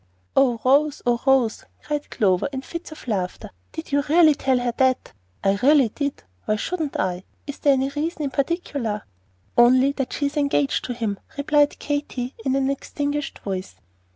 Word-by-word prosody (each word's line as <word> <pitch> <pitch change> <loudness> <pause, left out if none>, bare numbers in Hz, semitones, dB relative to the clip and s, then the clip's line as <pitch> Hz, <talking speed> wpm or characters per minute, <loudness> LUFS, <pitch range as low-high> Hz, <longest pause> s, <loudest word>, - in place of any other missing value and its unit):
"Oh, 250 -4 +4
Rose, 285 +3 +3
oh, 240 -1 +2
Rose," 260 -5 +3 0.2
cried 295 -1 -3
Clover, 185 -1 +1
in 265 -1 -5
fits 335 +1 -7
of 310 - -11
laughter, 200 0 -3 0.2
"did 320 -2 -7
you 285 0 +3
really 320 -1 +6
tell 265 -2 +1
her 245 -1 -1
that?" 260 -1 +1 0.3
"I 195 0 +2
really 275 -3 +5
did. 280 - -4 0.2
Why 215 - +1
shouldn't 315 +5 -3
I? 180 0 -1 0.2
Is 285 -1 -7
there 285 - +4
any 265 0 +1
reason 305 +3 -3
in 275 - -2
particular?" 275 - -2 0.5
"Only 255 +3 +6
that 270 -2 -3
she 290 - -1
is 280 +1 -2
engaged 285 0 +1
to 245 - -4
him," 215 -4 -2 0.2
replied 290 0 +2
Katy, 285 -4 -3
in 265 +1 +1
an 270 0 +1
extinguished 285 +1 -3
voice. 190 -2 -4
270 Hz, 175 wpm, -23 LUFS, 240-290 Hz, 0.5 s, really